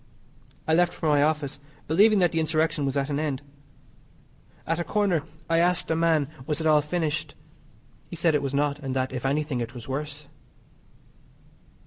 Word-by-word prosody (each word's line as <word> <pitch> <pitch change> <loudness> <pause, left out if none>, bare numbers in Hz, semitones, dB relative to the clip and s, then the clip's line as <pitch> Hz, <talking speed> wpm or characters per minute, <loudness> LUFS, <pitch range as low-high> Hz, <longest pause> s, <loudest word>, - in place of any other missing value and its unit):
I 160 - +2
left 175 +1 +3
for 160 - -1
my 145 -1 +4
office, 150 -2 0 0.3
believing 205 +7 +5
that 175 -3 +3
the 165 - 0
insurrection 155 -2 0
was 135 +1 -1
at 140 +1 -1
an 140 - 0
end. 145 -3 -2 1.2
At 165 +1 -1
a - - 0
corner 195 -5 +1 0.3
I 165 0 +2
asked 175 -1 +2
a - - +2
man 160 -3 +2 0.2
was 150 0 -1
it 160 - -3
all 155 -1 +5
finished. 155 -1 -2 0.7
He - - -7
said 165 -1 +2
it 150 - +2
was 140 -1 -3
not, 145 0 0
and 135 -2 -4
that, 130 0 -1
if 130 +1 -2
anything, 145 -2 -1
it 120 +2 -5
was 120 -2 -9
worse. 145 +2 -5
150 Hz, 180 wpm, -26 LUFS, 140-165 Hz, 1.2 s, believing